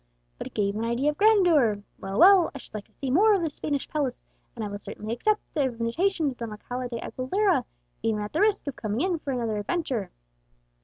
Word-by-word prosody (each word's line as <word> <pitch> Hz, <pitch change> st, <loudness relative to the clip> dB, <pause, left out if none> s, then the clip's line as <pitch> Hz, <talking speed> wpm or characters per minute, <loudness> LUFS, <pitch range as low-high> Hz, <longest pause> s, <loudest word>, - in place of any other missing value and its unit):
But -, -, -5 dB
it -, -, -14 dB
gave 200 Hz, -1 st, 0 dB
an 220 Hz, -, -2 dB
idea 240 Hz, +6 st, +1 dB
of 295 Hz, -, -12 dB
grandeur. 335 Hz, -, +4 dB, 0.2 s
Well, 195 Hz, +1 st, -4 dB
well, 370 Hz, +1 st, +7 dB
I -, -, -3 dB
should -, -, -13 dB
like 215 Hz, -1 st, -6 dB
to -, -, -31 dB
see 270 Hz, -2 st, -4 dB
more 415 Hz, +8 st, +5 dB
of 370 Hz, -, 0 dB
this 315 Hz, -3 st, -2 dB
Spanish 285 Hz, -2 st, -2 dB
palace, 280 Hz, -5 st, -3 dB, 0.3 s
and 225 Hz, -2 st, -4 dB
I -, -, -3 dB
will 205 Hz, 0 st, -6 dB
certainly 215 Hz, +2 st, -6 dB
accept 425 Hz, -, +1 dB
the 290 Hz, -4 st, +1 dB
invitation 275 Hz, +8 st, 0 dB
of 250 Hz, -, -11 dB
Don 230 Hz, -1 st, -5 dB
Alcala 245 Hz, +4 st, -5 dB
de 235 Hz, -, -4 dB
Aguilera, 380 Hz, -, 0 dB, 0.4 s
even 220 Hz, -2 st, 0 dB
at 210 Hz, -, -7 dB
the 320 Hz, -, +1 dB
risk 420 Hz, -1 st, +2 dB
of 280 Hz, -3 st, -4 dB
coming 215 Hz, +3 st, -2 dB
in 355 Hz, -2 st, 0 dB
for 280 Hz, -, -4 dB
another 230 Hz, -4 st, -1 dB
adventure." 250 Hz, -, -2 dB
260 Hz, 225 wpm, -26 LUFS, 225-340 Hz, 0.4 s, well